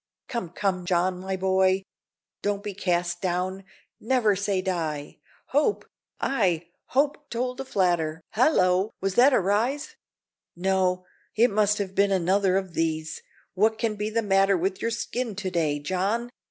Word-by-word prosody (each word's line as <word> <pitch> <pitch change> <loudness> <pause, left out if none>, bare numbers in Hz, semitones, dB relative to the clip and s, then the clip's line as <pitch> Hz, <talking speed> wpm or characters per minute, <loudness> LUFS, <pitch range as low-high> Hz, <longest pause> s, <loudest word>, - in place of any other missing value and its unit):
"Come, 235 -9 -4
come, 185 0 -1
John, 180 +1 +1
my 190 +1 -3
boy, 190 0 +2 0.6
don't 205 0 -1
be 205 -1 -4
cast 175 -2 -1
down! 185 +1 -2 0.3
Never 225 -3 +2
say 200 0 0
die! 160 -7 -3 0.3
Hope, 300 +9 +1 0.3
ay, 175 -10 0 0.2
hope 290 +2 0
told 250 +2 -2
a - - -6
flatter 170 -8 0
Hallo! 195 -6 +3
was 195 0 -1
that 250 +7 +6
a - - +4
rise? 240 - 0 0.6
No, 185 0 +1 0.3
it 230 +3 +4
must 210 0 +2
have 195 -2 -3
been 200 +1 +3
another 190 +1 +2
of 190 -3 -3
these 160 -1 -2 0.3
what 220 +3 +2
can 225 -1 0
be 210 +1 -2
the 230 +1 0
matter 195 -1 +3
with 190 +2 -2
your 230 - 0
skin 230 -1 -3
to 190 -2 -3
day, 155 -4 +1
John? 195 +10 -1
195 Hz, 155 wpm, -26 LUFS, 180-220 Hz, 0.6 s, that